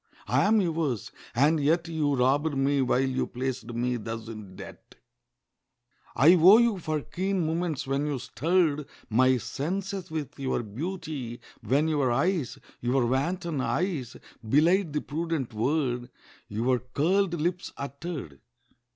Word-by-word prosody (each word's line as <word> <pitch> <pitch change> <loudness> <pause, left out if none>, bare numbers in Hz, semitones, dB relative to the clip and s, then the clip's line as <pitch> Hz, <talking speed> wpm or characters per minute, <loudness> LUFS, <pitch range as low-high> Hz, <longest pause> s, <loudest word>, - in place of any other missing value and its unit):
I - - +3
am 215 +2 +4
yours: 160 - -1 0.2
and 150 +6 +4
yet 165 +4 +2
You 155 -4 0
robbed 140 +4 +2
me 140 +1 +2
while 130 +1 +2
you 130 0 -1
placed 125 -1 -4
me 120 +1 -1
thus 115 0 -6
in 105 -4 -9
debt. - - -12 1.2
I 150 +8 +7
owe 185 +4 +8
you 235 -4 +3
for 155 -2 -2
keen 185 +2 -2
moments 160 -2 -1
when 135 +2 -1
you 145 -2 -1
stirred 150 +4 0 0.2
My 130 +3 +4
senses 185 - -4
with 150 -3 -5
your 130 -3 -1
beauty, 140 - -5 0.2
when 135 +8 +2
your 145 -5 +1
eyes 155 +2 0 0.2
(Your 125 +1 +1
wanton 160 +4 -1
eyes) 150 -6 -2 0.3
belied 165 - +3
the 150 - 0
prudent 155 -5 -3
word 125 +1 0 0.4
Your 120 +4 0
curled 170 - 0
lips 175 +3 -2
uttered. 140 - -6
145 Hz, 135 wpm, -27 LUFS, 125-170 Hz, 1.2 s, owe